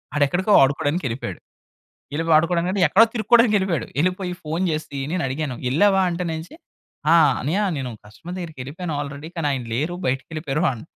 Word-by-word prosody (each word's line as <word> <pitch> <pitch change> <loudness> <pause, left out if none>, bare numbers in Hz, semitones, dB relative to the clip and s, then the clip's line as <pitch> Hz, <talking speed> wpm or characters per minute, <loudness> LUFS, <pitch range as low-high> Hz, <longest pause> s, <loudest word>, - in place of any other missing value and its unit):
ఆడెక్కడికో 175 +8 +2
ఆడుకోడానికెళ్ళిపోయాడు. 145 -2 -1 0.7
యెళ్ళిపో 165 +2 -1
ఆడుకోడానికంటే, 175 +3 +1
ఎక్కడో 225 +4 +6
తిరుక్కోడానికెళ్ళిపోయాడు. 215 - +3
యెళ్ళిపోయి 180 +1 0
ఫోన్ 165 +5 -1
జేసి, 155 -2 -4
నేనడిగాను. 145 -5 -2
"యెళ్ళావా 195 +8 +3
అంటేనేంచి?" 170 - -4 0.6
"ఆ! - - +7 0.3
అన్నయ్య 165 +10 0 0.2
నేను 130 -2 -4 0.2
కస్టమర్ 170 +12 -9
దగ్గరికెళ్ళిపోయాను 160 0 -6
ఆల్రెడీ, 145 +2 -8
కానీ 150 -3 0
ఆయన 130 -3 -2
లేరు 155 +8 -1
బయటికెళ్ళిపోయారు" 150 +4 -2
అన్ 115 - -9
160 Hz, 125 wpm, -22 LUFS, 140-180 Hz, 0.7 s, ఆ